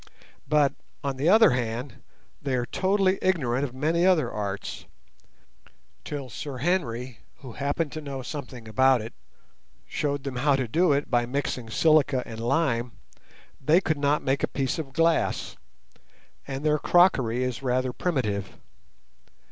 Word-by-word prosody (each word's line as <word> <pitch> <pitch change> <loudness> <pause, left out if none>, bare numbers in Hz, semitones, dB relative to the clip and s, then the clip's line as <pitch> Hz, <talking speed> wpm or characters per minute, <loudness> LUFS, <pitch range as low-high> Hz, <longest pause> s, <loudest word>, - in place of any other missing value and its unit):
But, 150 -2 +3 0.3
on 140 -2 -2
the 145 +6 +2
other 220 -1 +7
hand, 120 +1 -3 0.4
they 135 -2 -1
are 120 -1 0
totally 190 - +1
ignorant 140 -9 +1
of 130 -3 -4
many 160 +5 +1
other 180 -4 +3
arts. 100 -2 -5 1.2
Till 140 -3 -5
Sir 130 +4 -6
Henry, 125 - -1 0.2
who 130 -3 -9
happened 145 +5 -2
to 155 - -6
know 135 -3 -6
something 125 -4 -7
about 130 +1 +3
it, 115 - -8 0.7
showed 145 -2 -2
them 135 -3 -4
how 140 +2 +3
to 130 -2 -1
do 170 +8 +2
it 140 0 0
by 120 -1 +2
mixing 125 -3 -3
silica 145 -1 +3
and 110 -1 -8
lime, 120 -1 0 0.7
they 155 +6 +5
could 155 -5 -1
not 145 +1 +1
make 135 +1 0
a - - +1
piece 135 +2 -2
of 140 -4 -5
glass, 165 +1 +1 0.9
and 135 +2 -5
their 150 0 +3
crockery 130 -11 +3
is 125 -1 -3
rather 130 -1 0
primitive. 105 - -2
135 Hz, 150 wpm, -26 LUFS, 125-155 Hz, 1.2 s, other